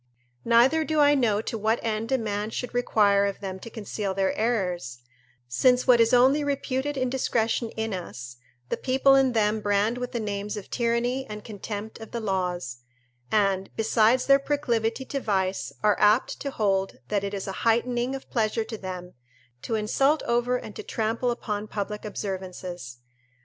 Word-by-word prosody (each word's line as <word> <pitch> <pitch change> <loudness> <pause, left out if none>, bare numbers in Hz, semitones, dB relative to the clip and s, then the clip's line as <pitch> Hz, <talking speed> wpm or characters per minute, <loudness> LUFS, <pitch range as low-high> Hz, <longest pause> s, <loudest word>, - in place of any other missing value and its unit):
Neither 245 +7 +5
do 310 0 0
I 290 0 +6
know 220 -6 +2
to 225 - -4
what 220 +2 +1
end 225 +1 -2
a 265 - +4
man 210 -2 -2
should 250 +2 -4
more 245 - +2
require 200 -4 +3
of 200 - -4
them 190 -2 -5
to 230 - -9
conceal 205 -3 -4
their 195 -1 +1
errors, 180 - -1 0.5
since 250 - +3
what 245 -3 +6
is 230 - +4
only 265 +4 +5
reputed 280 0 -2
indiscretion 245 -3 0
in 220 -1 -2
us, 125 -9 -7 0.3
the - - -1
people 270 +1 +3
in 270 -2 +4
them 215 -1 +1
brand 205 +4 +1
with 250 0 -4
the 240 - -2
names 205 -1 -3
of 200 - -9
tyranny 240 +2 0
and 210 0 -7
contempt 210 0 -6
of 225 - -9
the 235 - -4
laws, 180 - -2 0.5
and, 195 -2 +2
besides 225 +2 +3
their 275 0 +6
proclivity 255 -4 -1
to 275 +1 -3
vice, 190 -5 -1
are 210 -1 +3
apt 210 +4 +3
to 280 - -3
hold 195 -6 0
that 205 -2 0
it 200 0 -3
is 195 - -4
a 195 - -3
heightening 240 +2 +1
of 270 - -8
pleasure 225 -1 +1
to 220 -1 -7
them, 180 -1 -7 0.5
to 225 - -2
insult 270 +8 +2
over 240 +1 +1
and 215 -4 -9
to - - -4
trample 225 +3 -1
upon 215 -3 -3
public 210 0 -4
observances. 185 - -6
220 Hz, 175 wpm, -26 LUFS, 200-245 Hz, 0.5 s, I